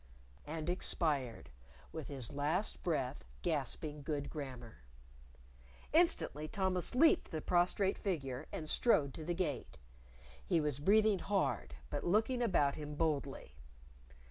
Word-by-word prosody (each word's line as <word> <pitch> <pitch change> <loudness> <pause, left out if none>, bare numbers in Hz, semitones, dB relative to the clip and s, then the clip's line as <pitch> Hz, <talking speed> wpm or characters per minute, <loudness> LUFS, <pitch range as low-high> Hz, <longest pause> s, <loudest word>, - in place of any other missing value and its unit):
And 155 +1 -4
expired, 145 - -1 0.4
with 160 -3 -6
his 135 -5 -5
last 155 +8 0
breath 135 - -1 0.2
gasping 150 -1 -2
good 145 0 -3
grammar. 130 - -7 1.1
Instantly 310 - +3
Thomas 190 +1 0
leaped 315 +5 +5
the 160 - -3
prostrate 180 +4 +2
figure 145 -8 -3
and 155 - -5
strode 150 - +3
to 160 - -7
the 175 +2 -2
Gate. 155 -9 -3 0.7
He 175 -3 +2
was 150 -3 0
breathing 210 +4 +4
hard, 195 +2 -1 0.2
but 145 - -2
looking 220 +7 +2
about 160 -11 +3
him 150 -1 -6
boldly. 145 -3 -1
155 Hz, 120 wpm, -35 LUFS, 145-190 Hz, 1.1 s, leaped